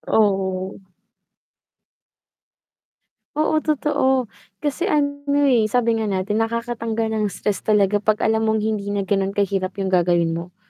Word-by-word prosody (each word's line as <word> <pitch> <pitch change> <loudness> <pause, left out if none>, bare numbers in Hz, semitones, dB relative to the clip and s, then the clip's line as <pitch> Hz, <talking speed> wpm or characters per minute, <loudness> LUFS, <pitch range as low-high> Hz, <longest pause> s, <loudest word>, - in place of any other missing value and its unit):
Oo. 190 -3 +1 2.6
Oo 310 +1 +2
totoo, 265 -5 0 0.3
kasi 300 +5 -1
ano, 285 -4 +1 0.2
eh, 245 -6 +4
sabi 230 0 +1
nga 220 - -1
natin 200 +2 -1
nakakatanggal 230 -1 -2
ng 215 -1 0
stress 200 0 -2
talaga 205 -1 +2
'pag 210 +1 0
alam 220 0 +2
mong 220 -1 +1
hindi 215 -2 -2
na 200 - 0
ganon 195 0 -1
kahirap 195 -2 -1
yung 195 -1 -2
gagawin 175 -2 +2
mo, 170 +2 -6
215 Hz, 130 wpm, -21 LUFS, 195-230 Hz, 2.6 s, eh